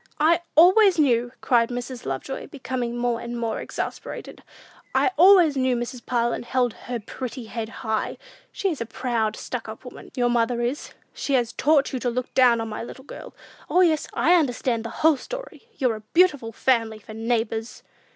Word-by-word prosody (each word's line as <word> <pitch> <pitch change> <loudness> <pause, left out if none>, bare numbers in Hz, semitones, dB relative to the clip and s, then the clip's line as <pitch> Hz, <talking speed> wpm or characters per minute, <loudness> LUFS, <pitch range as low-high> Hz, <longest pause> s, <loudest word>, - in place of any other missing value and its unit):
"I 330 +3 +4
always 375 +4 +6
knew," 245 -5 +2
cried 235 -2 +3
Mrs. 245 - -6
Lovejoy, 135 - -4
becoming 250 -3 -4
more 240 -1 -1
and 240 0 -5
more 230 -1 -2
exasperated, - - -6 0.5
"I - - +3
always 350 -3 +6
knew 260 -1 +1
Mrs. 240 0 -5
Parlin 235 -1 0
held 245 -1 0
her - - -19
head 240 -4 -5
pretty 255 -1 -6
high! 220 0 -3 0.3
She 390 - -1
is 305 - -5
a 230 - -3
proud, 225 -3 -1
stuck - - -6
up - - -9
woman, - - -11
your 245 -2 +2
mother 240 0 +1
is; 245 +5 -3 0.2
she 280 - -3
has 240 -2 0
taught 290 0 +2
you 260 - -1
to 245 - -1
look 250 +1 -4
down 245 -3 +5
on 225 - -3
my 215 - -5
little 260 +3 -10
girl! - - -10 0.3
O, 365 - +4
yes, 320 -4 +2
I 345 - +3
understand 250 -7 +1
the 230 - -5 0.2
whole 320 -3 +6
story! - - -8
You're 250 -5 +1
a - - -12
beautiful 295 -10 +3
family 225 -2 +1
for 215 0 -12
neighbors!" 225 0 -2
245 Hz, 180 wpm, -24 LUFS, 230-285 Hz, 0.5 s, always